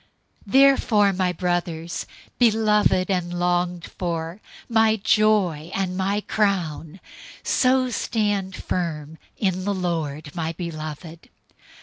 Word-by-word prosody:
004:001 - - -10
Therefore, 255 -7 +5
my 185 -1 0
brothers, 175 -1 -2 0.3
beloved 210 -5 +3
and 180 -2 -1
longed 175 0 0
for, 170 +1 -4 0.3
my 220 -1 +3
joy 200 -7 +2
and 195 +2 -1
crown, 180 -5 -1 0.4
so 255 -1 +2
stand 205 -5 -1
firm 160 -3 -4 0.2
in 185 -2 0
the 200 +1 -1
Lord, 160 -5 -3
my 165 -1 -3
beloved. 160 0 -7
185 Hz, 100 wpm, -23 LUFS, 165-210 Hz, 0.4 s, Therefore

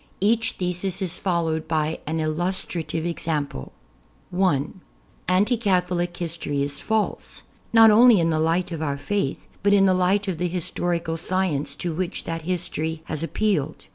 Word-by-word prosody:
Each 225 +3 +2
thesis 180 +1 -1
is 185 -4 -2
followed 165 -4 -1
by 160 0 0
an 160 +1 -1
illustrative 165 0 -2
example: 150 - -2 0.6
(1) 175 -2 0 0.5
Anti 200 +7 +3
Catholic 180 -4 0
history 160 -4 -2
is 140 0 -1
false, 220 -1 -2 0.3
not 225 -1 +8
only 230 -1 +7
in 165 -1 +2
the 155 - +1
light 165 +3 +1
of 165 -2 -4
our 140 -3 -1
Faith, 145 -2 -2
but 200 +1 +3
in 195 -1 +5
the 190 - +4
light 185 +3 +2
of 180 -4 -2
the 180 - +1
historical 170 -1 -2
science 160 -6 -1
to 170 +2 -3
which 180 +2 -3
that 165 0 -4
history 160 -2 -2
has 155 -1 -4
appealed. 165 -4 -1
175 Hz, 155 wpm, -24 LUFS, 160-190 Hz, 0.6 s, not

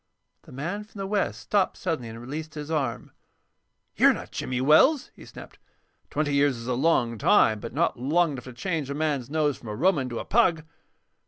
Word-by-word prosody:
The - - -16
man 170 +11 -4
from 210 0 -17
the 195 - -3
West 200 +1 -1
stopped 200 -3 0
suddenly 160 -10 -3
and 115 +1 -9
released 155 +6 -7
his 150 +1 -6
arm. 140 -7 -2 0.8
"You're - - +5
not - - -9
Jimmy 125 -1 -3
Wells," 155 - +4
he - - -13
snapped. - - -12 0.5
"Twenty 145 -1 -1
years 140 -2 +2
is 115 - -8
a 125 - -1
long 125 -5 +1
time, 110 +1 +4
but 115 - -7
not 150 -2 0
long 160 +6 +2
enough 130 -4 -7
to 130 - -9
change 155 +1 -3
a 140 - -3
man's 145 -5 -1
nose 150 -2 0
from 120 - -13
a 105 - -4
Roman 145 - +1
to 120 - -5
a - - -5
pug." 175 -8 +2
145 Hz, 200 wpm, -26 LUFS, 125-165 Hz, 0.8 s, You're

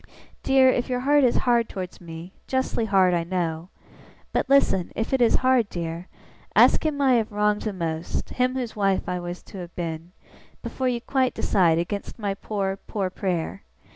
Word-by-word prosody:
'Dear, 270 -1 +4
if 250 0 0
your 250 -1 -1
heart 290 +2 +4
is 245 - +3
hard 235 -2 +3
towards 185 -3 -7
me 170 +2 -9
justly 260 -3 0
hard, 190 -3 +3
I 170 -1 +1
know 170 -1 -3 0.6
but, - - -1
listen, 235 -10 +3
if 225 +4 -2
it 265 - +2
is 235 - +4
hard, 255 -5 +3
dear, 170 +1 -5 0.5
ask - - +5
him 305 -2 -1
I 270 -2 +4
have 225 -1 -1
wronged 210 0 +1
the 215 - -2
most 165 -3 -4
him 255 0 0
whose 250 -3 -4
wife 195 -2 +1
I 180 0 -2
was 175 0 -6
to 195 - -10
have 175 -1 -9
been 165 0 -5 0.5
before 260 - -2
you 240 -1 -2
quite 260 0 0
decide 170 -4 +2
against 195 +4 -4
my 205 -3 -2
poor 195 -1 -3
poor 195 -3 -2
prayer! 175 - -3
200 Hz, 185 wpm, -24 LUFS, 175-250 Hz, 0.6 s, ask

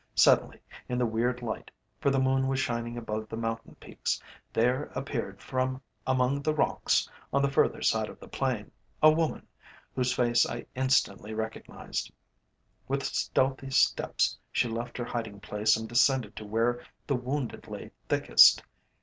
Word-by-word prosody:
Suddenly, - - +4 0.3
in 125 - -1
the 125 - +2
weird 120 +2 -1
light, 110 - -4 0.3
for 140 - +2
the 135 - +2
moon 130 0 +2
was 135 0 0
shining 120 -2 -2
above 110 -2 -4
the 110 - -5
mountain 115 0 -4
peaks, - - -3 0.3
there 125 +5 +2
appeared 125 -7 -4
from 130 0 -1 0.3
among 130 +2 +2
the 155 +2 0
rocks - - +2 0.2
on 140 0 +2
the 140 - +2
further - - +2
side - - +2
of - - -12
the - - -12
plain 125 -6 -2 0.3
a 155 - +9
woman, 160 0 -1 0.5
whose 125 -1 +1
face 120 -1 +3
I 120 - -4
instantly 120 -5 +1
recognised. 110 0 -5 0.8
With - - -1
stealthy 135 0 0
steps 135 - +2 0.2
she - - +1
left 115 +1 -4
her 120 - -3
hiding 115 -4 -4
place 105 +1 +1
and 110 0 -5
descended 120 -1 +2
to 110 - -6
where 120 +3 0 0.2
the 140 - 0
wounded 125 +1 -3
lay - - -8 0.2
thickest. - - +6
125 Hz, 160 wpm, -29 LUFS, 115-130 Hz, 0.8 s, a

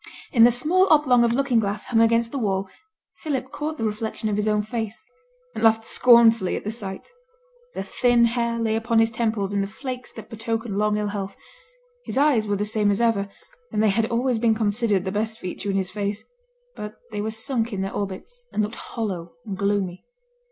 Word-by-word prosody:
In 230 -3 +7
the 240 - +6
small 335 +11 +3
oblong 260 -6 +5
of 235 - +3
looking 255 -1 +2
glass 205 -1 -2
hung 225 -2 +2
against 230 0 +3
the 275 - -3
wall, 195 -3 -1 0.5
Philip 265 -4 -3
caught 310 +1 -4
the - - -4
reflection 220 0 -2
of 205 - 0
his 210 +1 -1
own 210 0 +2
face, 220 0 -5 0.5
and - - -5
laughed 225 0 +4
scornfully 230 -4 +5
at - - -5
the 215 - -3
sight. 195 -4 -6 0.7
The - - -3
thin 240 +4 +3
hair 235 0 0
lay 225 -1 0
upon 225 +1 0
his 225 0 +4
temples 220 -3 -1
in 200 - +1
the 195 - -1
flakes 250 +3 -7
that 220 - -10
betoken 225 -1 -3
long 210 +1 +1
ill 210 -1 -1
health; 195 -1 -5 0.7
his - - -4
eyes 270 -7 +3
were 205 - +1
the 205 +1 -1
same 210 -1 +1
as 200 - +1
ever, 220 -4 +1 0.4
and 210 - +1
they 215 - +4
had 220 +2 +1
always 240 0 0
been 225 -1 +3
considered 210 -2 +1
the 190 - -2
best 220 +2 -1
feature 185 +1 -5
in 195 - 0
his 190 -1 -2
face; 205 +1 -3 0.5
but 210 0 -7 0.2
they 205 -1 -3
were 215 - -2
sunk 225 +1 -1
in 195 -2 -3
their 195 0 -3
orbits, 205 - -5
and 215 - 0
looked 210 +2 -3
hollow 185 -7 -5
and 200 -3 -4
gloomy. 200 -2 -1
220 Hz, 210 wpm, -24 LUFS, 205-235 Hz, 0.7 s, In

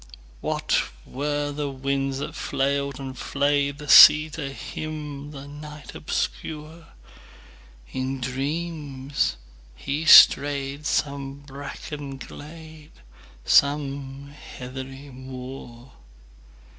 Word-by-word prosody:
What - - 0 0.2
were 145 +2 -2
the 145 0 -3
winds 135 0 -2
that 140 - -5
flailed 140 0 -1
and 135 -1 -6
flayedThe 140 +2 -1
sea 155 +2 +9
to 140 -3 -5
him, 150 -1 -6
the 140 -1 -9
night 150 +1 -10
obscure? 160 +2 -4 1.1
In 130 +1 -3
dreams 140 - -2 0.4
he 145 - -3
strayed 140 -1 +6
some 140 -1 -1
brackened 140 0 -8
glade, 155 0 -12 0.5
Some 140 -1 +1
heathery 135 0 -9
moor. 130 -1 -10
140 Hz, 85 wpm, -24 LUFS, 135-150 Hz, 1.1 s, sea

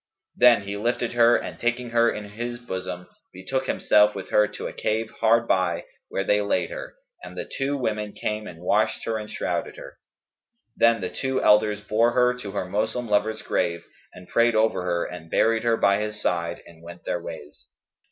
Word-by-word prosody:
Then 120 -4 +6
he 100 +1 -5
lifted 120 +2 -1
her 120 0 +5
and, - - -7
taking 120 0 -1
her 115 0 +4
in 105 - -5
his 120 +3 -5
bosom, 95 -6 -6 0.3
betook 130 +9 -3
himself 105 0 +3
with 95 -2 -7
her 105 0 +4
to - - -8
a - - -5
cave 110 +1 -2
hard 115 +1 +3
by, 90 -3 +1 0.2
where 95 - -1
they 105 +1 +2
laid 100 - 0
her, - - -7 0.3
and - - -10
the - - -4
two 140 +1 -2
women 105 -5 -2
came 105 0 -3
and 85 0 -11
washed - - +1
her 110 -1 -1
and 105 0 -8
shrouded - - -3
her. - - -11 0.8
Then 115 -2 +4
the 90 -1 -3
two 130 +8 -2
elders 105 0 +4
bore 115 +3 +2
her 125 0 +4
to 105 - -6
her 95 -1 -3
Moslem 110 +5 -2
lover's 105 +1 0
grave 85 0 -1 0.3
and 90 - -13
prayed 120 -1 +3
over 110 -3 +2
her 85 -1 -1
and 85 -2 -9
buried 115 +4 +2
her 115 -1 +2
by 100 -1 +3
his 105 0 -4
side 85 -1 -2
and 85 -1 -16
went 85 +1 -12
their - - -2
ways. 70 -4 -10
105 Hz, 195 wpm, -24 LUFS, 95-120 Hz, 0.8 s, Then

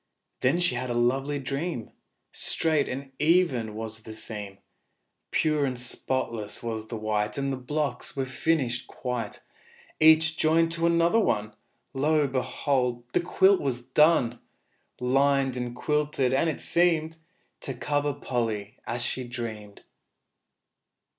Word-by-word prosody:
Then 135 +7 +2
she 175 -7 +2
had 125 +1 -3
a 120 - -1
lovely 135 +4 +1
dream; 135 0 -3 0.4
Straight 155 -3 +1
and 135 +1 -5
even 150 -10 +2
was 110 0 -6
the 110 0 -9
seam, 105 -3 -5 0.7
Pure 155 -2 +2
and 125 -2 -2
spotless 120 -4 -2
was 110 -2 -4
the 115 - -5
white; 105 -1 -1
All 140 0 -1
the - - -1
blocks 140 0 -3
were 135 -1 -1
finished 130 -2 -1
quite 125 -4 -4 0.6
Each 160 +1 +6
joined 165 +1 +3
to 165 0 +1
another 170 +5 +3
one. 105 - 0 0.4
Lo, 150 +2 +2
behold! 130 -1 -1
the - - +4
quilt 190 +3 +4
was 125 -4 -2
done, 130 -5 +3 0.6
Lined 135 +1 +2
and 125 -1 -4
quilted, 150 -2 0
and 160 +5 +2
it 155 - -3
seemed 165 -2 +2 0.4
To 135 - -4
cover 145 +3 0
Polly 115 -7 -3
as 120 +1 -2
she 130 - -2
dreamed! 110 -4 -7
130 Hz, 135 wpm, -27 LUFS, 120-155 Hz, 0.7 s, Each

